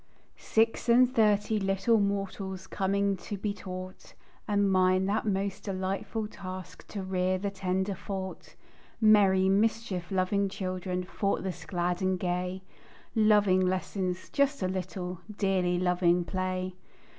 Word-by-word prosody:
Six 225 +2 +1
and 250 +2 +5
thirty 210 -1 +3
little 195 +3 +2
mortals 195 -1 -2
Coming 200 0 0
to 205 +3 -6
be 200 +1 -2
taught; 185 -1 -8 0.3
And 205 -1 +2
mine 185 0 +3
that 210 +3 0
most 195 -1 -1
"delightful 195 +3 -2
task 185 -3 -9
To 200 -2 -5
rear 185 0 0
the 200 +1 -3
tender 190 0 -1
thought." 190 0 -6 0.4
Merry, 200 -4 +5
mischief 200 -3 +1
loving 195 +1 +1
children, 185 -1 -3
Thoughtless, 190 -1 -2
glad 175 -1 -1
and 185 -1 +1
gay, 180 +1 -2 0.5
Loving 210 -4 +4
lessons 185 0 -1
"just 280 -5 +1
a - - +2
little," 185 -1 -4 0.2
Dearly 185 -3 +1
loving 180 -1 +2
play. 185 0 -2
190 Hz, 125 wpm, -29 LUFS, 185-200 Hz, 0.5 s, and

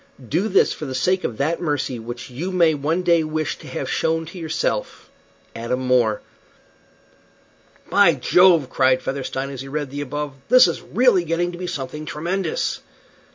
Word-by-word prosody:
Do 180 +8 +1
this 195 -2 +3
for 155 - -7
the 130 - -5
sake 185 +8 +1
of 110 - -3
that 160 +4 -1
mercy 145 -6 -2
which 120 +3 -8
you 165 +10 -4
may 170 -3 +4
one 155 +5 -1
day 170 -2 +3
wish 155 -1 -3
to - - -12
have - - -4
shown 165 0 0
to 175 +3 -10
yourself. 160 -1 -3 0.4
"ADAM 115 +3 -2
MORE." 125 -4 +2 1.7
"By 190 -6 +5
Jove!" 170 +2 +4
cried 130 0 +2
Featherstone, 135 0 -3
as 135 -2 -6
he 135 - -8
read 145 -1 -4
the 145 +1 -4
above, 145 +1 -4 0.2
"this 250 -5 +8
is 170 - -3
really 225 -4 +3
getting 170 +2 -1
to 175 - -9
be 180 - -4
something 150 +1 -5
tremendous." 190 - -2
155 Hz, 170 wpm, -21 LUFS, 135-175 Hz, 1.7 s, this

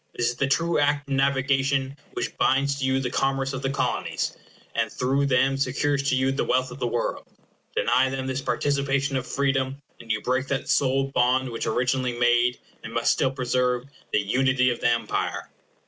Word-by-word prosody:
This 120 - +1
is - - -8
the 140 - +1
true 165 +4 +1
Act 145 0 +1
of 140 - -3
Navigation 135 0 +1 0.2
which - - -3
binds 140 +1 +2
to 135 - -1
you 130 0 +2
the 125 -2 -2
commerce 135 0 0
of 130 - -4
the 135 - -1
Colonies, 140 0 -2 0.4
and - - 0
through 135 +2 0
them 135 +1 +2
secures 140 +1 0
to 130 - +2
you 130 +1 +2
the 135 - -1
wealth 130 0 0
of 130 - -9
the 125 - 0
world. 120 0 -2 0.5
Deny 130 +1 +3
them 130 0 -3
this 130 0 -2
participation 140 0 0
of 130 -1 -2
freedom, 135 -1 0 0.2
and 115 -1 -6
you 110 - +1
break 130 +3 -1
that 135 -1 -2
sole 135 0 +2
bond 130 0 +2
which 115 - -3
originally 125 +1 0
made, 120 0 +3 0.3
and - - -7
must - - +2
still 130 - +1
preserve, 125 -1 0 0.3
the - - +3
unity 125 +4 +2
of 120 - -4
the - - +3
Empire. 120 0 -2
130 Hz, 195 wpm, -25 LUFS, 125-135 Hz, 0.5 s, Deny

